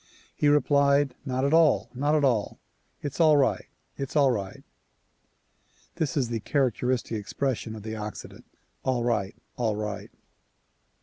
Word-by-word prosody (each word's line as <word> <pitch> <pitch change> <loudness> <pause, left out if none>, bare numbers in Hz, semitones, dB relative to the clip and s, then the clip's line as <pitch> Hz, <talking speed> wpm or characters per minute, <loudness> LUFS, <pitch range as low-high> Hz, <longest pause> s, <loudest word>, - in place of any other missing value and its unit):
He 150 - +1
replied 140 -1 +3
"Not 130 0 -1
at 140 - +1
all! 135 -10 +4
Not 145 +4 +1
at 150 - +2
all! 120 -7 +1 0.5
It's 145 +2 -5
all 155 -2 +6
right! 135 -2 +1 0.3
It's 135 +1 -5
all 140 -3 +5
right!" 100 -5 -4 1.3
This 160 0 -1
is 125 -4 +1
the 115 -1 -2
characteristic 125 0 0
expression 115 +1 -3
of 105 - -9
the 110 0 -5
Occident,— 105 -1 -8 0.3
"All 130 -2 0
right!" 110 -4 -1 0.2
"All 115 -4 0
right!" 105 -1 -5
130 Hz, 140 wpm, -27 LUFS, 110-140 Hz, 1.3 s, all